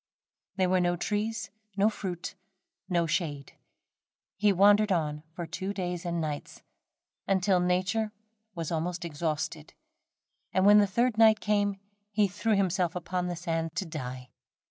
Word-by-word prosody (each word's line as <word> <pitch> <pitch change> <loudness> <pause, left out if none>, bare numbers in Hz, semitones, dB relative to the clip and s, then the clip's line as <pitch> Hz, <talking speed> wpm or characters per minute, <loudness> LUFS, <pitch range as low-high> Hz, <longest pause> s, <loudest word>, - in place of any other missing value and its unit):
There 190 -1 +2
were 185 0 +3
no 175 0 +2
trees, 210 +1 -2 0.3
no 200 +2 +4
fruit, 185 -5 -4 0.6
no 170 -2 +2
shade. 150 -5 -2 0.8
He 205 +1 +3
wandered 205 +2 +5
on 150 -4 0
for 175 - -4
two 190 +4 -4
days 180 -2 -3
and 170 0 -1
nights, 150 -2 -5 0.6
until 190 -1 +3
nature 185 +5 +1 0.4
was 165 -2 -4
almost 170 +2 -2
exhausted, 155 0 -3 0.8
and 190 0 +4
when 205 +1 +8
the 205 - +4
third 235 +3 +1
night 220 -1 +7
came, 205 -1 +1 0.3
he 210 0 +2
threw 210 +3 0
himself 185 -3 +1
upon 180 +1 -2
the 175 - -2
sand 165 -1 -2
to 195 - -1
die. 125 -6 -6
180 Hz, 145 wpm, -29 LUFS, 165-205 Hz, 0.8 s, when